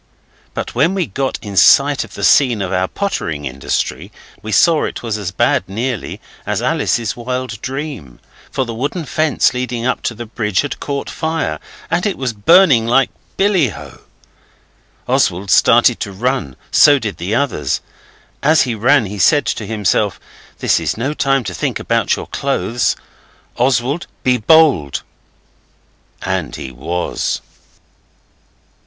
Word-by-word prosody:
But - - -4
when 155 +10 +2
we 185 -3 0
got 130 +6 -2
in 100 -2 -7
sight 95 - +5
of - - -13
the - - -6
scene 120 -7 +4
of 95 0 -3
our 95 0 +1
pottering 80 - -3
industry 65 0 -3 0.3
we 110 +1 -6
saw 155 - +4
it - - -6
was 115 -3 -2
as 100 -4 -3
bad 95 - +1
nearly 115 +4 -3 0.2
as - - -2
Alice's 115 -3 0
wild 125 -2 -4
dream. 135 - -6 0.3
For 130 - -1
the 115 - -5
wooden 145 +8 -3
fence 155 -1 +1
leading 125 -1 -3
up 130 - 0
to 115 - -10
the 120 +2 -7
bridge 105 -4 -1
had 145 - -5
caught 140 -1 -4
fire, 160 - -2 0.3
and 175 +4 +1
it 200 - -2
was 130 -3 -2
burning 130 - +5
like 135 +3 +3 0.3
billy 190 - +2
oh. - - -11 1.1
Oswald 95 +3 +1
started - - +5
to 100 - -4
run; 105 - -2 0.2
so 145 -1 +6
did 110 -6 -4
the 95 +6 -2
others. 115 - 0 0.6
As 155 +2 +4
he 125 - -2
ran 120 +3 +3
he 100 +1 -6
said 145 - +4
to 105 - -3
himself, 105 -3 0 0.4
'This - - +2
is - - -2
no 135 +6 -1
time 135 -2 +1
to 95 -4 -5
think 80 - -2
about - - +1
your - - -6
clothes. 115 +7 -1 0.6
Oswald, 130 +5 0 0.2
be 125 -1 +3
bold!' 125 - +3 1.2
And - - -2
he 65 - -7
was. 80 +8 -3
120 Hz, 150 wpm, -17 LUFS, 100-140 Hz, 1.2 s, so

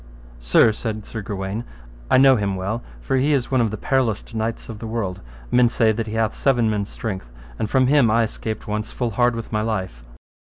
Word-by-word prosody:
Sir, - - +5
said 110 -1 -5
Sir 110 - -6
Gawaine, 100 +1 -4 0.5
I - - +5
know 135 0 +7
him 100 -4 -1
well, 100 +5 -3 0.2
for 130 - 0
he 140 +3 +2
is 135 -3 0
one 130 -2 +3
of 115 - +2
the 110 - -5
perilloust 120 -3 0
knights 115 +1 -3
of 110 -2 -8
the 115 - -6
world; 105 -5 -3 0.3
men 125 -1 +5
say 115 -1 +3
that 110 +1 -3
he 105 - -5
hath 110 -1 +1
seven 120 -5 +2
men's 105 -1 -2
strength, 95 - -5 0.3
and 110 - -1
from 130 +1 +3
him 135 -3 +4
I 115 +2 +3
escaped 110 0 -5
once 105 +1 -3
full 120 -2 -2
hard 120 +2 +2
with 115 -1 -6
my 105 -1 0
life. 95 - -3
110 Hz, 215 wpm, -22 LUFS, 105-120 Hz, 0.5 s, know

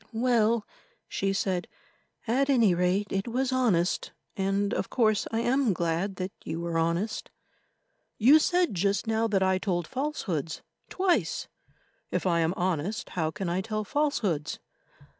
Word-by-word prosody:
"Well," 230 -2 +2 0.4
she 195 0 -1
said, 190 -2 -1 0.6
"at 265 +4 +1
any 230 -8 +5
rate 180 +4 +1
it 195 +2 -1
was 255 +2 0
honest, 215 -9 +1 0.2
and 195 +1 0
of - - -2
course 215 -4 +2
I 225 0 0
am 250 -2 +2
glad 170 +3 -1
that 185 +1 -4
you 160 +1 -4
were 170 -1 -1
honest." 170 +6 -1 0.9
"You 270 +8 +7
said 355 - +2
just 195 +2 0
now 225 0 +1
that 195 -3 +2
I 190 0 +2
told 175 -3 -1
falsehoods—twice; 270 - -2 0.6
if - - -2
I 170 -2 +2
am 165 +2 +1
honest, 185 +3 -1
how 160 -3 -1
can 195 +2 -4
I 175 +2 0
tell 215 +1 -3
falsehoods?" 210 - -1
200 Hz, 140 wpm, -28 LUFS, 180-235 Hz, 0.9 s, You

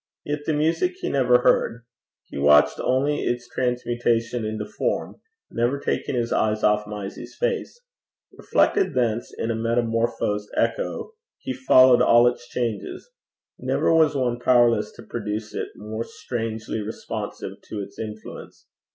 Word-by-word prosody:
Yet 145 0 -3
the 160 - +2
music 165 - +1
he - - -2
never 125 -3 +3
heard; 120 +1 +2 0.4
he - - -7
watched 75 +1 +5
only 140 +3 +1
its 120 0 -2
transmutation 120 -1 -1
into 110 -1 -3
form, 105 - -3 0.3
never 120 +4 0
taking 140 - -2
his 120 -1 -1
eyes 110 0 +1
off 105 0 +2
Mysie's 105 -2 -7
face. 485 -1 -2 0.5
Reflected 400 -2 +1
thence 120 -2 0
in 115 - -3
a - - -1
metamorphosed 115 -2 0
echo, - - -1 0.3
he 130 - -5
followed 130 -1 +6
all 120 +1 +6
its 120 0 -2
changes. 125 - -4 0.5
Never - - +1
was 160 -3 +4
one 125 -3 0
powerless 120 -1 +3
to - - -12
produce 105 +1 -5
it - - -3
more 110 +2 -5
strangely 115 -6 -4
responsive 105 +2 -6
to 105 - -4
its 100 - -10
influence. 110 -1 -8
120 Hz, 140 wpm, -24 LUFS, 110-130 Hz, 0.5 s, followed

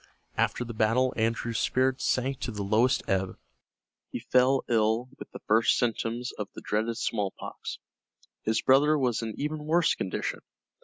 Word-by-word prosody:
After 125 - 0
the 115 - -6
battle 115 +4 +2
Andrew's 115 0 -1
spirits 130 0 +1
sank 130 +1 0
to - - -3
the 105 -2 -4
lowest 115 +6 +2
ebb. 95 -1 -1 0.7
He - - -4
fell 130 +1 +3
ill 115 +2 +1
with - - -9
the - - -9
first 110 +2 +4
symptoms 120 +1 -1
of 105 - -3
the - - -8
dreaded 110 +2 -1
smallpox. 105 -4 -4 0.6
His 110 +1 0
brother 145 +4 +5
was 125 -5 0
in 110 -1 -5
even 150 +1 -3
worse 170 +1 +3
condition. 95 - -3
120 Hz, 155 wpm, -28 LUFS, 110-130 Hz, 0.7 s, brother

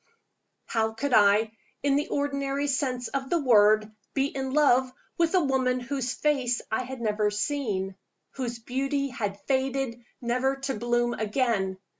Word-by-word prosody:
How 220 -1 0
could 270 +4 -2
I 210 +1 +5 0.3
(in 280 -1 +3
the 290 +1 0
ordinary 280 0 -1
sense 260 -3 -1
of 270 -1 -3
the 345 - +2
word) 215 -6 +4 0.2
be 270 -1 +2
in 265 -1 -2
love 260 -3 +4 0.3
with 335 +2 +3
a 365 - +4
woman 260 -2 +1
whose 255 0 -2
face 265 -5 +1
I 220 - +1
had 260 -1 -7
never 210 -1 +1
seen? 205 -4 -2 0.4
whose 245 -3 -4
beauty 275 +4 -2
had 205 -6 -4
faded, 265 -2 -1 0.2
never 255 +3 0
to 270 0 -3
bloom 240 +1 0
again? 215 -4 0
255 Hz, 150 wpm, -27 LUFS, 225-275 Hz, 0.4 s, I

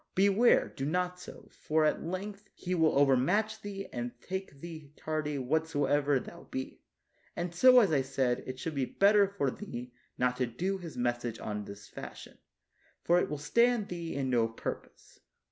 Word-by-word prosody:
Beware, 200 +5 +4
do 135 - -4
not 180 +4 -1
so, 180 - -11
for 155 -1 +1
at 150 - +1
length 195 +4 -5
He 180 - -3
will 160 -5 +3
overmatch 180 - +3
thee 195 -1 -6
and 120 0 -5
take 190 -3 -6
thee 155 -3 -9
tardy 155 -2 -2
what 155 +5 0
soever 145 -2 +2
thou - - -11
be; 130 0 -5 0.5
and 175 0 -3
so, 255 +8 +7
as 200 -7 +2
I 145 -3 +3
said, 130 -2 0
it 130 0 -5
should 160 +4 -4
be 135 -3 0
better 200 +6 +4
for 185 -9 -1
thee 125 -11 -7 0.2
not 125 0 +1
to 125 - +1
do 190 +11 -2
His 170 -3 -8
message 120 -1 -1
on 105 -1 -4
this 100 +1 -10
fashion, - - -10 0.6
for 175 +1 +4
it - - -1
will 150 - -3
stand 235 +8 +2
thee 170 -2 -5
in 135 -2 -1
no 115 -2 +3
purpose. 115 - -7
155 Hz, 180 wpm, -31 LUFS, 130-190 Hz, 0.6 s, so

